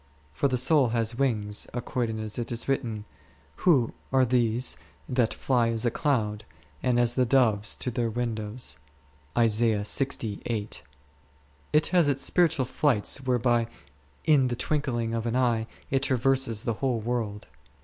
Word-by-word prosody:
For 140 - +1
the 130 -2 0
soul 135 +1 +4
has 115 0 +1
wings, 105 -6 0
according 120 -2 -2
as 110 +1 -4
it 120 - -4
is 120 -1 -3
written, 115 -6 -2 0.5
who 135 -10 +3 0.2
are 130 -1 +4
these 120 0 +2 0.3
that 125 -3 +1
fly 120 -3 +1
as 115 +1 -1
a 120 - +2
cloud, 110 -6 -1 0.4
and 125 -2 +1
as 120 -1 +4
the 130 - +2
doves 115 -5 +2
to 125 - -2
their 120 -1 -1
windows 115 0 -4 0.6
P? - - +3
It 110 0 0 1.1
has 175 -5 +4
its 135 -1 0
spiritual 160 -7 +3
flights, 135 -1 0
whereby 120 -2 +1 0.6
in 145 -5 +4
the 120 - -2
twinkling 120 -4 -2
of 115 0 -2
an 115 - -1
eye 120 -3 +1 0.2
it 135 0 +2
traverses 130 -4 +2
the 115 - -1
whole 130 -4 0
world. 110 -2 -3
120 Hz, 145 wpm, -27 LUFS, 115-130 Hz, 1.1 s, soul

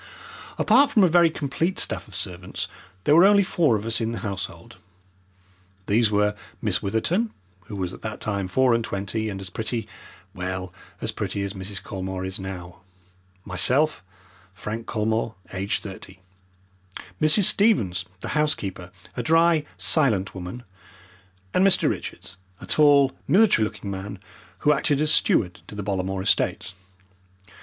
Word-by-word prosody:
Apart 265 +6 +5
from 225 -8 +4
a - - +6
very 170 0 +5
complete 160 +4 -2
staff - - -1
of 100 - -11
servants 90 -1 -4 0.4
there 145 - +4
were 170 - +8
only 200 +1 +6
four 165 -9 +2
of 105 0 -3
us 115 +1 +1
in 115 +1 -1
the - - -4
household. 100 -2 -6 1.1
These 110 +2 +3
were 105 0 +2 0.3
Miss - - 0
Witherton, 170 - 0 0.4
who 105 - -8
was 95 -2 -3
at - - -11
that 110 -1 -5
time 100 -3 -2
four 125 +6 +3
and 115 0 +1
twenty 110 +2 -3
and 95 -2 -5
as 95 -1 -7
pretty 110 +3 -3 0.5
well, 90 -1 -5 0.3
as - - -1
pretty 100 - -3
as 100 0 -4
Mrs. 100 +1 -3
Colmore 95 -2 -5
is 95 +1 -4
now 90 -2 -8 0.6
myself, 125 - +2 0.5
Frank 110 +5 -6
Colmore, 110 +1 -1 0.2
aged 95 +2 -2
thirty, 95 -1 -9 1.0
Mrs. 155 +7 +6
Stevens, 105 - +3 0.2
the - - -5
housekeeper, 100 - -1 0.3
a 125 - -2
dry, 165 +3 +3
silent 110 - +3
woman, 95 +6 -7 0.9
and 185 - +3
Mr. 195 -1 +4
Richards, 95 - -5 0.2
a - - -9
tall 145 -3 +5 0.2
military 195 - +4
looking 105 -2 -6
man, 100 +1 -6 0.5
who 150 - +6
acted 145 0 +1
as 155 +1 +3
steward 90 -4 +2
to - - -10
the 105 - -4
Bollamore 95 -1 -2
estates. 95 - 0
105 Hz, 150 wpm, -24 LUFS, 95-150 Hz, 1.1 s, were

